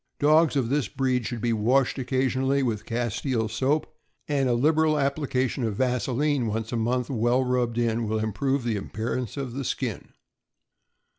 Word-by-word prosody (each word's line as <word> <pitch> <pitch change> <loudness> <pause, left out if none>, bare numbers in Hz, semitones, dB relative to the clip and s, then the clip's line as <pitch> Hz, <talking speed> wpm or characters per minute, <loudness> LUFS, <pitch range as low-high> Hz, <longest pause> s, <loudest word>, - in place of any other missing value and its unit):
Dogs 155 +2 +4
of 130 -5 +1
this 140 -4 +1
breed 130 -2 -1
should 120 -3 -5
be 120 0 +1
washed 125 +5 +2
occasionally 130 +1 +1
with 110 -5 -2
castile 120 0 -1
soap, 135 +8 -1 0.3
and 140 -3 +1
a 120 - +3
lib 150 +6 +2
eral 155 -1 +3
application 135 -2 0
of 110 -3 -1
vaseline 130 +2 0
once 110 +1 -3
a - - -2
month, 120 +3 0
well 120 +1 +2
rubbed 125 -2 0
in, 115 -1 0
will 110 +1 0
improve 125 +5 -1
the 115 -3 -1
appearance 115 +5 -4
of 135 -4 -4
the 135 +2 -3
skin. - - -4
125 Hz, 165 wpm, -26 LUFS, 115-135 Hz, 0.3 s, Dogs